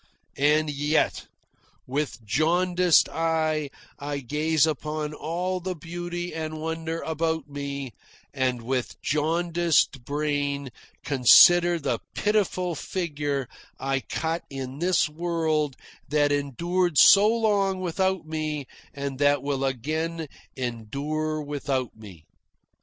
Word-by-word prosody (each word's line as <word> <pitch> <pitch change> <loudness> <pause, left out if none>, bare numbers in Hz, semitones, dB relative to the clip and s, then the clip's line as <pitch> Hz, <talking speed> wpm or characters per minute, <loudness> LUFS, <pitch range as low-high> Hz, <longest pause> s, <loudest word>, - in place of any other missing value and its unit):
And 150 +2 +3
yet, 145 +2 0 0.6
with 130 -4 -3
jaundiced 175 - +3
eye 155 -2 0 0.3
I 145 0 -3
gaze 150 +4 +1
upon 150 0 -3
all 175 +5 -2
the 185 +1 -4
beauty 175 +2 -5
and 155 -1 -4
wonder 160 +1 -3
about 160 -1 -2
me, 140 -2 -5 0.4
and 125 -3 -1
with 125 +1 -3
jaundiced 165 -2 +1
brain 145 -1 -2 0.3
consider 170 +6 +6
the 155 - -2 0.2
pitiful 195 -4 0
figure 145 -5 -3 0.3
I 135 0 0
cut 160 +5 -3
in 135 0 -6
this 175 -1 +2
world 155 -3 -1 0.3
that 145 0 +2
endured 170 +5 0
so 200 +7 +8
long 205 -4 +1
without 190 0 -1
me 155 -2 -3 0.3
and 140 -1 -4
that 145 -1 +3
will 140 -1 -1
again 155 +5 -2 0.3
endure 140 +6 -3
without 140 -4 -3
me. 95 -8 -13
155 Hz, 110 wpm, -26 LUFS, 140-170 Hz, 0.6 s, so